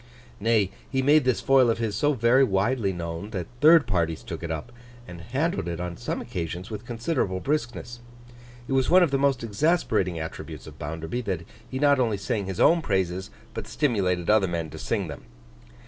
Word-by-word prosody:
Nay, 105 -3 +2 0.2
he 130 -1 0
made 145 0 +5
this 130 -2 +1
foil 135 -3 +5
of 115 - +1
his 115 -3 -2
so 145 +7 +2
very 120 +2 +4
widely 100 0 +1
known, 85 +2 -5
that 95 -5 -4
third 155 +1 +7
parties 85 -4 -1
took - - -6
it 85 - -5
up, 80 +9 -5 0.4
and 85 -1 -9
handled 130 - -1
it 85 -1 -3
on 90 -1 -4
some 120 - -4
occasions 90 -3 -5
with 110 +2 -7
considerable 120 - -1
briskness. 120 -2 -3 0.7
It - - -2
was 130 -1 +2
one 180 +1 +7
of 165 - +1
the 135 - +1
most 135 -4 +2
exasperating 110 - +1
attributes 80 -3 -7
of - - -12
Bounderby, 80 +10 -4
that 90 -4 -3 0.2
he 130 - -4
not 140 0 +4
only 115 -5 +1
sang 100 0 -2
his 95 -2 -5
own 170 0 +5
praises 95 - -1 0.2
but - - -6
stimulated 95 - 0
other 105 -2 +4
men 85 -3 -3
to - - -8
sing - - -1
them. - - -9
110 Hz, 195 wpm, -26 LUFS, 90-130 Hz, 0.7 s, third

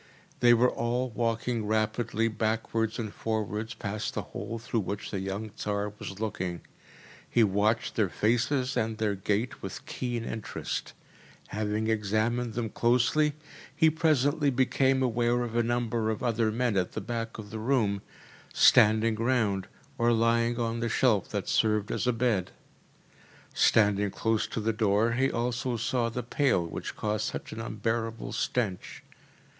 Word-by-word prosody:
They 120 -1 +6
were 125 +2 +4
all 120 +2 -1
walking 115 -1 -1
rapidly 110 +1 0
backwards 110 0 -1
and 110 -3 -4
forwards 110 +1 -3
past 105 0 -4
the - - -2
hole 115 - -6
through 115 0 -2
which 100 0 -4
the 100 - -2
young 100 +3 -4
Tsar 105 -1 -3
was 95 +1 -7
looking. 95 -5 -3 0.7
He 120 - +4
watched 105 +2 +1
their 105 -4 +2
faces 120 +6 +1
and 110 0 -1
their 110 -2 0
gait 105 +5 -2
with - - -7
keen 120 -2 -3
interest. 110 -2 -4 0.6
Having 105 +1 -1
examined 110 +2 0
them 115 -3 -2
closely, 125 +6 +2 0.4
he 160 -1 +5
presently 150 -2 +2
became 130 +1 +2
aware 120 0 +1
of 115 -1 -5
a 120 - +4
number 115 -1 0
of 110 +1 -3
other 115 -2 +1
men 115 -2 0
at 90 -1 0
the - - -3
back 115 -1 -4
of 105 -2 -9
the 110 - -5
room, 110 -5 +1 0.5
standing 110 +1 +5
round, 110 -5 +1 0.3
or 120 0 +4
lying 115 +1 +2
on 115 0 -1
the 115 0 -1
shelf 115 -5 +2
that - - -3
served 105 -2 +1
as - - -1
a - - +5
bed. 115 -6 0 1.0
Standing 105 -2 +3
close 110 +2 0
to - - -4
the 110 +1 0
door 110 +1 +2
he 130 +3 +2
also 125 +1 -1
saw 120 +1 0
the 125 +2 -4
pail 120 -7 +1
which 85 - -6
caused 105 0 -1
such - - -6
an 110 - -5
unbearable 115 +1 -3
stench. 105 -7 -2
115 Hz, 155 wpm, -28 LUFS, 105-120 Hz, 1.0 s, They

